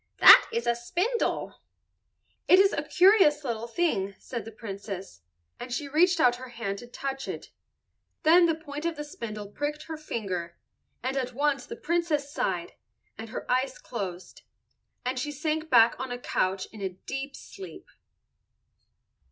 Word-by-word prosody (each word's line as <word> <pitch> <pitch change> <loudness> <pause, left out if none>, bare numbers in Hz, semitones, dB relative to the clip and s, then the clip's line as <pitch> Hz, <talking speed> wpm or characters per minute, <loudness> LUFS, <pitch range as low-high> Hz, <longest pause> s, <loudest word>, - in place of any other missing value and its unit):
"That - - +9
is 235 +1 -2
a 235 - +3
spindle." 360 - -2 0.9
"It 365 - +8
is 390 +1 +5
a - - 0
curious 360 -6 +5
little 235 -3 -3
thing," 215 - 0
said 235 -3 -6
the 225 - -8
Princess, 195 - -7 0.4
and 250 - -7
she 280 +4 -2
reached 340 +5 +3
out 245 -4 +4
her 255 +1 -9
hand 215 -5 -4
to 240 - -10
touch 270 +2 -5
it. - - -6 0.7
Then 340 +2 +6
the 325 - +1
point 300 -2 -8
of 335 -1 -1
the 295 - -5
spindle 215 -8 -7
pricked 295 +7 -3
her 320 -1 -6
finger, 185 - -4 0.5
and 260 +2 -1
at 255 -2 -2
once 285 0 0
the 460 - -6
Princess 335 -9 -1
sighed, 185 - -2 0.4
and 225 +1 -8
her - - -6
eyes 260 +1 0
closed, 190 -6 -6 0.6
and 255 +1 -1
she 295 +3 -3
sank 310 +2 -2
back 235 -2 +5
on 260 -1 -4
a 245 - -3
couch 190 -5 -1
in 215 - -11
a 190 - -1
deep 270 +9 -6
sleep. 185 -5 -10
260 Hz, 160 wpm, -28 LUFS, 220-305 Hz, 0.9 s, That